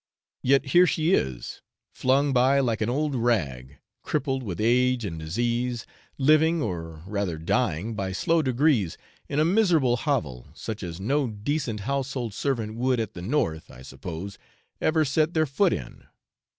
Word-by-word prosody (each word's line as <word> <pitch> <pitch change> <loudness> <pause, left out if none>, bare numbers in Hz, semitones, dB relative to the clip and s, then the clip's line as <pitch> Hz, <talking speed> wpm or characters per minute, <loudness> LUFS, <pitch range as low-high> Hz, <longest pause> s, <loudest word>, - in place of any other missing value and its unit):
Yet 135 +2 +3
here 180 +1 +7
she 165 +2 +1
is, 65 - -1 0.3
flung 135 +2 +2
by 130 +2 +4
like 115 -5 0
an 110 - +1
old 145 +3 0
rag, 75 - -1 0.2
crippled 135 -3 -1
with 95 -8 -5
age 125 +1 +2
and 80 -4 -5
disease, 120 +8 -1 0.3
living, 155 +4 +4
or 80 - -4
rather 100 -4 -2
dying 80 +5 0
by 95 -2 -3
slow 165 - +2
degrees 130 - +1 0.3
in 145 - 0
a 155 - +4
miserable 165 - +3
hovel, 115 - -2
such 110 -1 -6
as 85 -2 -6
no 135 +7 +1
decent 115 +1 -3
household 135 -2 -2
servant 115 -2 -2
would 125 0 +1
at 110 -3 -3
the 90 - -8
North, 90 - -1
I 65 - -13
suppose, 85 +9 -7 0.4
ever 155 0 +2
set 155 +4 +1
their 160 0 +3
foot 170 +7 +2
in. 60 - -6
120 Hz, 155 wpm, -26 LUFS, 95-140 Hz, 0.4 s, here